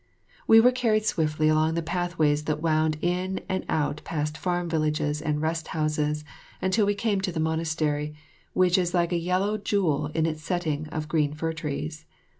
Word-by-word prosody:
We 225 - +8
were 245 +3 +6
carried 225 -4 +1
swiftly 155 -4 +1
along 155 +1 +3
the 170 - -1
pathways 160 -4 0
that 155 -1 -1
wound 155 -1 +1
in 180 +2 -1
and 190 0 -1
out 150 -1 0
past 150 -1 -2
farm 175 +1 -1
villages 150 -2 0
and 150 -1 -1
rest 160 0 -1
houses 150 -1 0 0.3
until 200 +3 +2
we 205 - +2
came 205 -2 0
to 190 -1 -1
the 165 - -4
monastery, 155 -2 -1 0.4
which 185 0 +4
is 180 0 0
like 170 0 +2
a - - +2
yellow 185 +5 0
jewel 165 -8 +1
in 160 -1 +2
its 155 -1 -2
setting 155 -3 -2
of 155 0 -4
green 150 -2 +1
fir 160 +1 -2
trees. 150 -1 -5
160 Hz, 180 wpm, -26 LUFS, 150-180 Hz, 0.4 s, We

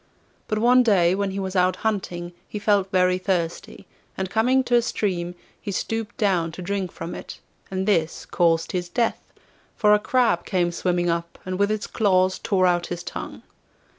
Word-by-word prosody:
But 215 - -1
one 245 +3 +5
day 185 -7 +4
when 200 +1 -1
he 195 +1 -4
was 190 0 -4
out 185 0 +3
hunting 175 -5 -2
he - - -6
felt 205 -2 +2
very 185 -1 +2
thirsty, 175 -3 -3 0.3
and 190 -1 -3
coming 255 +4 +3
to 245 - -3
a 240 - +6
stream 180 -6 -2 0.3
he 205 - -4
stooped 225 +3 -3
down 185 -8 +1
to 185 - -8
drink 195 -1 -2
from 165 +1 -7
it, - - -8 0.3
and 190 +1 -2
this 165 -6 +1
caused 165 -1 +1
his 180 -2 -3
death, 230 +5 0 0.5
for 210 -2 +4
a 210 - +5
crab 230 -7 +2
came 175 -2 0
swimming 175 0 0
up, 170 0 -4
and 185 0 -3
with 200 0 +3
its 215 -1 -1
claws 185 -3 +2
tore 190 -4 +1
out 175 -1 +2
his 175 0 -5
tongue. - - -7
190 Hz, 185 wpm, -24 LUFS, 175-210 Hz, 0.5 s, a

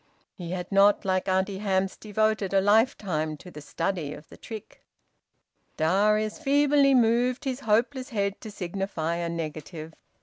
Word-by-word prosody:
He 175 -2 -8
had 180 +1 -5
not, 200 +1 +4
like 185 0 0
Auntie 190 +1 0
Hamps, 195 -2 0
devoted 215 -2 -1
a - - +6
lifetime 195 - +1
to 180 +4 -13
the 150 - -10
study 165 0 -3
of 150 - -14
the - - -12
trick. 220 -3 -10 1.0
Darius 210 - +2
feebly 285 -1 +4
moved 245 +2 +2
his 260 -1 -2
hopeless 255 +4 0
head 200 -4 -2
to 220 - -8
signify 180 -4 -3
a 170 -1 -2
negative. 160 0 -6
195 Hz, 145 wpm, -26 LUFS, 175-225 Hz, 1.0 s, a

